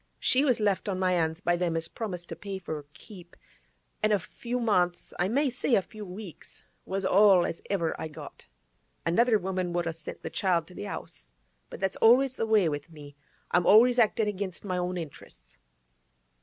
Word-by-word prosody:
She 260 +2 +3
was 255 -6 +2
left 205 -1 0
on 190 - -1
my 185 -1 +1
'ands 160 -1 0
by 175 -2 +2
them 170 -2 -1
as 165 - -1
promised 180 -6 -6
to - - -5
pay 200 -1 -6
for 185 -4 -6
her 150 -2 -6
keep; 180 +1 -14 0.7
an' 215 - +2
a 210 - +4
few 240 +6 -5
months, 180 -6 0
I 175 - +2
may 270 +5 +1
say 245 0 +1
a - - +3
few 210 0 -10
weeks, 185 -1 -10 0.2
was 195 0 -2
all 190 -2 +5
as 170 - -4
ever 170 -5 0
I - - -3
got. 155 - -11 0.6
Another 225 +7 +3
woman 185 -2 -3
would 175 -1 0
a 165 - -2
sent 160 -1 -9
the 160 - -5
child 175 -4 +1
to - - -13
the 205 - -6
'Ouse; - - -8 0.4
but - - -9
that's 195 -1 -1
always 255 +3 +5
the 225 - -2
way 215 -5 +4
with 145 0 -4
me; 145 -3 -12 0.4
I'm 175 -1 +2
always 245 +4 +6
actin' 220 -1 +3
against 200 -2 -4
my 185 -2 -1
own 180 +1 -2
interesses. 135 - -10
185 Hz, 200 wpm, -28 LUFS, 175-215 Hz, 0.7 s, always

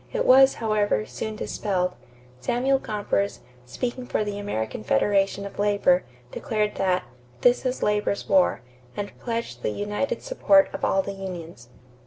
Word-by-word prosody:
It - - -1
was, 265 +1 +7
however, 210 - +1
soon 125 - -5
dispelled. 185 -4 -1 0.5
Samuel 255 - +1
Gompers, 205 -3 -2 0.3
speaking 250 - -4
for - - 0
the 205 -1 -4
American 110 - -3
Federation 195 - +1
of 200 - -9
Labor, 200 -3 +3 0.3
declared 210 -2 -1
that 185 -1 +1 0.4
"this 245 +1 +3
is 255 - -2
labor's 210 -1 0
war," 185 - +3 0.4
and 205 0 -4
pledged 230 - -4
the - - -1
united 205 - -2
support 295 -12 +3
of - - -6
all 195 0 +2
the 200 - -5
unions. 170 -10 -8
205 Hz, 145 wpm, -25 LUFS, 185-230 Hz, 0.5 s, was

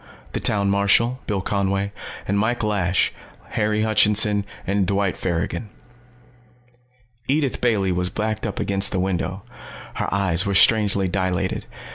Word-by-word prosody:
The - - -2
town 100 -2 +1
marshal, 100 +5 +3
Bill 100 -3 -1
Conway, 100 0 -1 0.4
and 100 +1 +1
Mike 115 +3 0
Lash, 95 -4 +1 0.4
Harry 105 0 0
Hutchinson, 105 -1 +3 0.2
and 100 -1 +1
Dwight 100 -1 0
Farrigon. 90 +5 -3 1.6
Edith 140 -1 0
Bailey 105 -6 +2
was 90 0 0
backed 110 +2 -2
up - - -5
against 100 0 +1
the 95 - -1
window. 95 +1 -2 0.5
Her - - -3
eyes 95 -3 +1
were 100 -2 -1
strangely 100 -2 +4
dilated. 95 0 -1
100 Hz, 130 wpm, -22 LUFS, 95-105 Hz, 1.6 s, strangely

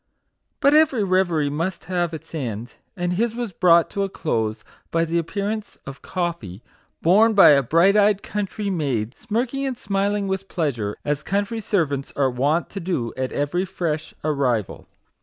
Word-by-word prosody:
But 280 - +5
every 295 -8 +4
reverie 175 -6 +1
must 165 +3 -3
have 175 -1 -1
its 160 0 -9
end; 120 -6 -4 0.2
and 175 0 -1
his 225 +4 0
was 240 -3 -3
brought 170 -2 +4
to 200 - -2
a 195 - 0
close 110 - -2 0.3
by 165 0 +1
the 170 +1 0
appearance 205 +5 -4
of 135 0 -9
coffee, 165 - -4 0.4
borne 215 +6 +5
by 195 - +9
a 140 -2 +6
bright 170 - +4
eyed 205 -1 +3
country 205 0 -3
maid, 135 - -2
smirking 240 +5 -2
and 265 -3 -2
smiling 200 -1 -1
with 190 0 -3
pleasure, 120 - -2
as 150 0 -1
country 205 +6 -1
servants 155 -10 -1
are 135 -2 +2
wont 145 +7 0
to 195 - -5
do 165 -11 -2
at 130 0 -3
every 145 +6 -1
fresh 165 -5 -3
arrival. 135 - -1
175 Hz, 165 wpm, -22 LUFS, 145-200 Hz, 0.4 s, by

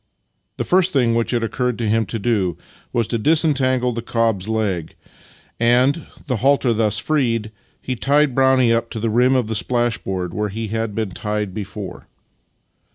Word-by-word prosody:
The - - -1
first 185 0 +2
thing 125 -5 +2
which 115 0 0
it 120 -2 0
occurred 125 +1 -1
to 115 - -2
him 110 0 +1
to 115 - -3
do 100 -6 0 0.3
was 115 -2 0
to 115 - -1
disentangle 130 -4 +2
the 115 - -4
cob's 115 -4 0
leg, 100 -7 -2 0.6
and, 125 +6 +3 0.2
the 125 -3 -1
halter 135 0 +3
thus 110 -2 +1
freed, 115 -8 0 0.3
he 130 - -4
tied 140 +3 +2
Brownie 130 -2 +4
up 115 0 0
to 110 - -5
the 115 0 -1
rim 125 +3 +3
of 125 -3 +2
the 110 - -2
splashboard 105 -6 -1
where 105 0 -2
he 110 +2 -5
had 110 -1 -3
been 110 -3 -2
tied 105 -1 -3
before. 100 -2 -7
115 Hz, 170 wpm, -20 LUFS, 105-130 Hz, 0.6 s, Brownie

